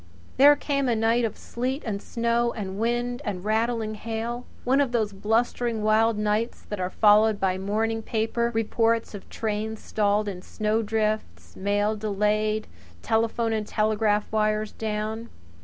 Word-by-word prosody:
There 290 +2 +8
came 280 -2 -1
a 235 - +2
night 225 +2 +2
of 220 - -4
sleet 260 +4 -3
and 200 -3 -3
snow, 235 0 0
and 195 -2 -5
wind 240 +2 -1
and 200 -5 -4
rattling 220 0 0
hail 230 +3 -4 0.2
one 265 +3 +3
of 260 -4 0
those 215 -4 0
blustering, 225 +2 0
wild 220 +1 +3
nights 210 +2 -1
that 210 - -4
are 180 0 -1
followed 210 +1 +4
by 190 -1 0
morning 220 +3 -1
paper 225 +2 -1
reports 225 +1 +1
of 205 - -9
trains 220 0 -3
stalled 210 0 0
in 185 -3 -5 0.5
drifts, 215 - -2
mail 205 +2 0
delayed, 215 +1 0 0.4
telephone 225 0 +1
and 215 -1 -2
telegraph 215 -1 +1
wires 215 0 +1
down. 220 +1 -4
220 Hz, 145 wpm, -25 LUFS, 210-230 Hz, 0.5 s, There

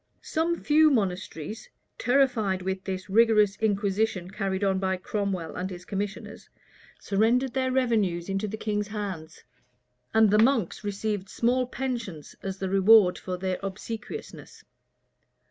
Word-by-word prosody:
Some 335 +2 -1
few 310 +1 +5
monasteries, 195 - -2 0.3
terrified 245 -8 +2
with 190 0 -3
this 185 -1 -4
rigorous 210 -1 +4
inquisition 205 -2 0
carried 195 -1 -2
on 190 -1 +2
by 190 -1 0
Cromwell 190 -4 -3
and 185 +1 -3
his 180 -1 -9
commissioners, 200 +1 -5 0.5
surrendered 235 +6 +1
their 260 -1 0
revenues 215 -10 +1
into 195 +2 -2
the 215 +2 -5
king's 210 -1 -2
hands; 195 -7 -6 0.7
and 220 -2 +5
the 210 - +4
monks 225 -5 +2
received 205 -1 -3
small 245 +4 +1
pensions 235 - -5
as 195 0 -4
the 190 - -3
reward 195 0 +5
of 180 -1 -3
their 185 -1 -1
obsequiousness. 220 - -7
205 Hz, 130 wpm, -27 LUFS, 190-225 Hz, 0.7 s, few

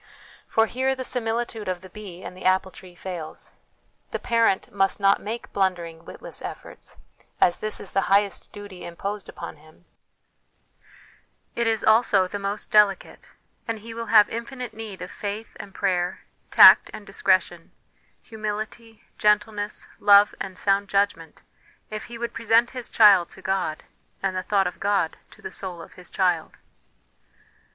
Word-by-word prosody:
For 225 - +3
here 260 +4 -1
the 260 - -5
similitude 230 -3 -2
of 180 -1 -3
the 185 - -12
bee 190 -4 -9
and - - -8
the 185 - -11
apple 185 0 +2
tree 180 -1 -14
fails. 175 -3 -8 0.6
The - - -3
parent 230 -4 +1
must 195 0 +1
not 195 0 +3
make 225 +3 -6
blundering, 175 -4 -1
witless - - -9
efforts: - - -9 0.4
as 175 - +3
this 215 0 -2
is - - -8
the 195 - +2
highest 200 0 +1
duty 205 -3 -10
imposed 195 +3 -6
upon - - -8
him, 155 +3 -21 1.7
it 235 -1 0
is 225 -1 0
also 220 -4 +4
the 205 +2 -5
most 200 +1 -4
delicate; 210 -2 +2 0.4
and 230 -1 -2
he 225 +2 -9
will 230 0 -6
have 210 -2 +6
infinite 240 +1 -6
need 215 -4 -8
of 180 - -8
faith 210 +2 -6
and 200 - -9
prayer, 180 -3 -1 0.3
tact - - +8
and 210 - -9
discretion, 185 -3 0 0.5
humility, 215 +1 -6 0.2
gentleness, 210 0 0
love, 205 0 +6
and 185 -1 -6
sound 200 0 +1
judgment, 200 -6 -1 0.5
if 215 0 -5
he 235 - -9
would 235 0 -4
present 230 +1 +2
his 250 -2 -7
child 200 -6 +6
to 190 - -15
God, 190 -5 -2 0.4
and 190 -1 0
the 185 - -1
thought 195 +1 +1
of 180 - -4
God 200 -5 0
to - - -19
the - - -6
soul 185 -3 -6
of 165 - -12
his 180 -1 -14
child. 180 -4 0
200 Hz, 160 wpm, -24 LUFS, 185-220 Hz, 1.7 s, tact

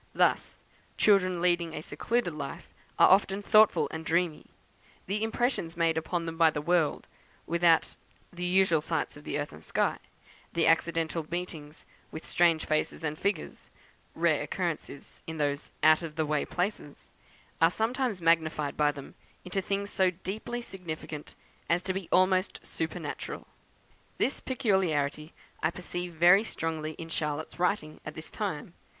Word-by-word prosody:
Thus, - - +1 0.3
children 185 -4 +3
leading 175 -2 +1
a 155 - -5
secluded 230 -4 -1
life 150 +3 -7 0.2
are - - +7
often 195 +1 +3
thoughtful 215 +1 +5
and 160 0 -5
dreamy: 165 -1 0 0.6
the 205 +3 -1
impressions 225 -7 -1
made 165 -1 +2
upon 165 +1 -2
them 165 0 -5
by 165 -1 +7
the 150 - -3
world 165 0 +1 0.4
without 170 -1 +3 0.4
the 180 0 -2
unusual 180 -3 +4
sights 160 0 -2
of 145 - -13
earth 145 0 -3
and 75 - -12
sky - - 0 0.5
the 170 - +2
accidental 165 -1 +1
meetings 165 -3 -6 0.3
with 160 - -7
strange 170 -2 +3
faces 155 +1 -1
and 155 0 -3
figures 200 -5 -3 0.5
(rare - - +2
occurrences - - -4
in 160 0 -5
those 145 -1 -1
out 155 +1 +6
of 160 -3 -6
the 160 -1 0
way 150 -1 0
places) 180 -5 -4 0.5
are 165 - +7
sometimes 225 -1 -1
magnified 160 -3 +2
by 150 -1 +3
them 140 -2 -10 0.3
into 185 +2 -1
things 200 +1 -2
so 190 -1 +3
deeply 200 +7 -5
significant 160 -7 -7 0.3
as 170 +1 +2
to 185 - -1
be 190 -2 -5
almost 185 +1 +2
supernatural. - - -4 0.7
This 275 - 0
peculiarity 165 - 0 0.3
I 155 - +2
perceive 175 0 -5
very 175 +5 +6
strongly 160 -6 -3
in 165 +1 -9
Charlotte's 155 +1 -3
writings 180 -4 0
at 155 - -7
this 155 - -7
time. 175 -6 -4
170 Hz, 145 wpm, -29 LUFS, 155-190 Hz, 0.7 s, are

